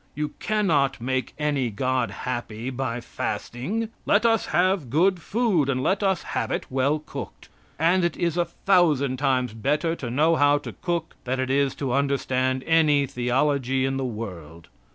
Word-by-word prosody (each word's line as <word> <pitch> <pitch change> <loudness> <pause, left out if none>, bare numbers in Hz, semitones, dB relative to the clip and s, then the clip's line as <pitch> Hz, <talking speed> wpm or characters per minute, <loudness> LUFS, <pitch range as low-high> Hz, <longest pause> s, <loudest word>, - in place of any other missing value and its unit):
You 150 0 -2
can 215 -1 0
not 140 -7 +2
make 130 +2 -2
any 145 -5 0
God 125 +2 0
happy 120 +2 -4
by 125 -2 -3
fasting. 190 - -3 0.2
Let 210 +3 +3
us 225 -2 +3
have 175 -4 +1
good 175 +6 +2
food, 195 - +1
and 130 -1 0
let 195 +7 +1
us 190 -4 +1
have - - -1
it - - -2
well 135 +3 +2
cooked 140 -7 -9 0.3
and 175 +4 +3
it 170 - 0
is 170 -2 0
a 175 -1 +2
thousand 160 -7 +2
times 130 -4 +1
better 150 +9 0
to 120 - -5
know 155 +6 +3
how 145 0 +4
to 145 - -7
cook 170 -2 -2
it - - -37
than 130 +1 -1
it 130 0 -1
is 140 -1 +2
to 135 -4 -2
understand 130 -2 0
any 155 -3 +3
theology 130 +1 0
in 135 0 -1
the 135 - -2
world. 90 -9 -7
140 Hz, 175 wpm, -25 LUFS, 130-165 Hz, 0.3 s, how